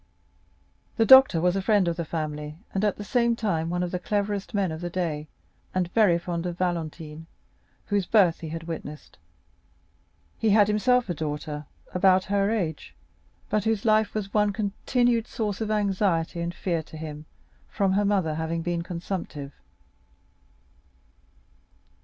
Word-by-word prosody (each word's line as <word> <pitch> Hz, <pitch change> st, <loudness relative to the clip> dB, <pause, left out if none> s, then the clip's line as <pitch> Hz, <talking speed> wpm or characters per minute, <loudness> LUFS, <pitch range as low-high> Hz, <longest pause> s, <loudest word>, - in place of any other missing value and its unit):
The 225 Hz, -, +4 dB
doctor 265 Hz, -8 st, +8 dB
was 180 Hz, +2 st, +2 dB
a 195 Hz, -, 0 dB
friend 205 Hz, -2 st, +3 dB
of 170 Hz, -, 0 dB
the 170 Hz, -1 st, -3 dB
family, 150 Hz, -1 st, -4 dB, 0.2 s
and 195 Hz, -, -1 dB
at 210 Hz, -2 st, +2 dB
the 205 Hz, -, -6 dB
same 235 Hz, +2 st, +2 dB
time 165 Hz, -8 st, -1 dB
one 175 Hz, +1 st, -1 dB
of 175 Hz, -, -3 dB
the 180 Hz, -, -2 dB
cleverest 205 Hz, +1 st, -2 dB
men 195 Hz, -4 st, 0 dB
of 160 Hz, +1 st, -6 dB
the 175 Hz, -, -3 dB
day, 165 Hz, -4 st, -3 dB, 0.5 s
and 180 Hz, -1 st, -1 dB
very 205 Hz, -7 st, +4 dB
fond 170 Hz, 0 st, -3 dB
of 175 Hz, -1 st, -5 dB
Valentine, 165 Hz, -3 st, -3 dB, 0.6 s
whose 200 Hz, -3 st, 0 dB
birth 190 Hz, -7 st, +4 dB
he 160 Hz, -, -6 dB
had 165 Hz, +1 st, -5 dB
witnessed. 160 Hz, -2 st, -8 dB, 1.2 s
He 225 Hz, -, +2 dB
had 205 Hz, 0 st, +5 dB
himself 245 Hz, +4 st, +2 dB
a 175 Hz, -, -1 dB
daughter 150 Hz, -1 st, -5 dB, 0.3 s
about 185 Hz, 0 st, +4 dB
her 200 Hz, 0 st, +2 dB
age, 175 Hz, -9 st, -3 dB, 0.5 s
but 210 Hz, -2 st, 0 dB
whose 220 Hz, -2 st, 0 dB
life 215 Hz, -1 st, +3 dB
was 205 Hz, -2 st, -3 dB
one 210 Hz, -1 st, +3 dB
continued 230 Hz, +3 st, 0 dB
source 210 Hz, -2 st, -3 dB
of 220 Hz, -, -2 dB
anxiety 195 Hz, -5 st, 0 dB
and 170 Hz, 0 st, -2 dB
fear 170 Hz, -3 st, -1 dB
to 160 Hz, 0 st, -12 dB
him 155 Hz, -1 st, -7 dB, 0.4 s
from 195 Hz, -3 st, +1 dB
her 205 Hz, +2 st, +2 dB
mother 195 Hz, -6 st, +1 dB
having 160 Hz, +1 st, -2 dB
been 175 Hz, 0 st, -1 dB
consumptive. 170 Hz, -5 st, -5 dB
180 Hz, 160 wpm, -26 LUFS, 165-210 Hz, 1.2 s, doctor